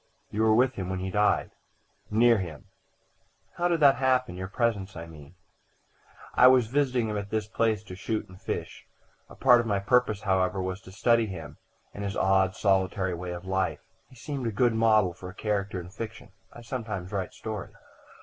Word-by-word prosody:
"You 105 - -1
were 110 -1 +4
with 130 +2 +3
him 95 -5 -5
when 95 - -2
he 95 +1 -4
died?" 105 +2 +2 0.6
"Near 115 +1 +4
him." 80 -6 -7 0.9
"How 175 - +2
did 170 -2 0
that 140 -3 +6
happen 130 -4 +1
your 95 +1 -5
presence, 100 -2 -1
I 85 0 -6
mean?" 80 0 -14 1.0
"I 125 - +7
was 130 -2 +6
visiting 125 -1 +1
him 105 -1 -2
at 100 0 -7
this 110 -1 -2
place 110 -2 0
to 95 - -10
shoot 110 +3 -3
and 90 0 -15
fish. - - -5 0.4
A - - -13
part 125 -2 +6
of 115 - -5
my 100 -2 +1
purpose, 105 0 +2
however, 95 -1 +1
was 95 +1 -3
to 95 - -13
study 115 +3 +2
him, 80 -6 -8 0.3
and 100 - -6
his 100 0 -3
odd, 95 -1 +2
solitary 95 -1 +1
way 90 +1 -5
of 90 +1 -6
life. 95 0 -1 0.3
He 130 - -17
seemed 135 0 -4
a - - -1
good 120 +2 +2
model 110 -5 +3
for 90 +1 -9
a 95 - -12
character 100 -3 -2
in 90 0 -9
fiction. 115 -1 -8 0.2
I 120 - -12
sometimes 110 -7 -5
write 95 -3 -3
stories." 110 -3 -6
105 Hz, 195 wpm, -27 LUFS, 95-115 Hz, 1.0 s, I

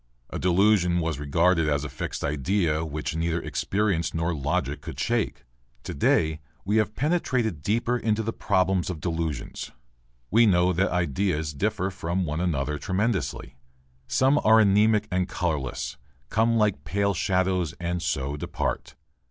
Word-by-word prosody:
A - - -4
delusion 90 -1 +3
was 80 -4 -2
regarded 80 +3 +2
as 70 -1 0
a - - -3
fixed 70 - -5
idea 80 +2 0
which 75 0 -4
neither 85 +1 0
experience 95 -4 -1
nor 85 +1 0
logic 75 -1 -2
could - - -8
shake. 60 - -1 0.4
To - - -5
day 80 +2 +2 0.3
we 105 +3 +1
have 110 -1 +1
penetrated 130 - 0
deeper 115 +7 0
into 110 -1 0
the 115 +1 -2
problems 95 -1 +1
of 90 -4 -4
delusions. 80 -1 -3 0.6
We 115 +2 +5
know 90 -1 +3
that 95 +3 +1
ideas 85 -2 -1
differ 95 +3 -1
from 90 0 -2
one 75 +1 -2
another 75 -4 -1
tremendously. 95 - -2 0.5
Some 135 +3 +3
are 110 +1 +6
anemic 105 +1 +4
and 90 0 0
colourless, 75 -10 -2 0.3
come 115 +1 +2
like 105 -3 +1
pale 100 0 0
shadows 90 -2 0
and 85 0 -2
so 70 -3 -2
depart. 85 +4 -3
90 Hz, 145 wpm, -26 LUFS, 80-105 Hz, 0.6 s, are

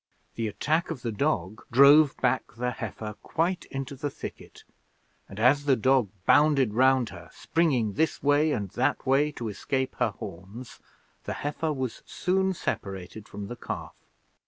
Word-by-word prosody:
The 115 -1 -2
attack 155 +10 0
of 155 -7 -5
the 115 - -1
dog 105 - -1
drove 140 +3 +7
back 130 -1 0
the 125 +1 -1
heifer 110 -2 -6
quite 170 +2 -1
into 135 0 -6
the 145 +2 -3
thicket, - - -10 0.7
and 100 - -9
as 135 +5 +4
the 140 -2 +4
dog 130 -2 +2 0.2
bounded 140 -6 +4
round 130 +1 +3
her, - - -11
springing 130 -11 0
this 160 +6 0
way 145 +2 +3
and 100 -8 -2
that 125 +2 0
way 140 +3 +3
to 120 - -5
escape 130 +5 -2
her - - +3
horns, 100 +4 -9 0.5
the - - -3
heifer 155 +2 -1
was 130 -5 -4
soon 190 +1 0
separated 95 - -5
from 100 0 -6
the 120 - -6
calf. - - -7
130 Hz, 160 wpm, -27 LUFS, 110-145 Hz, 0.7 s, drove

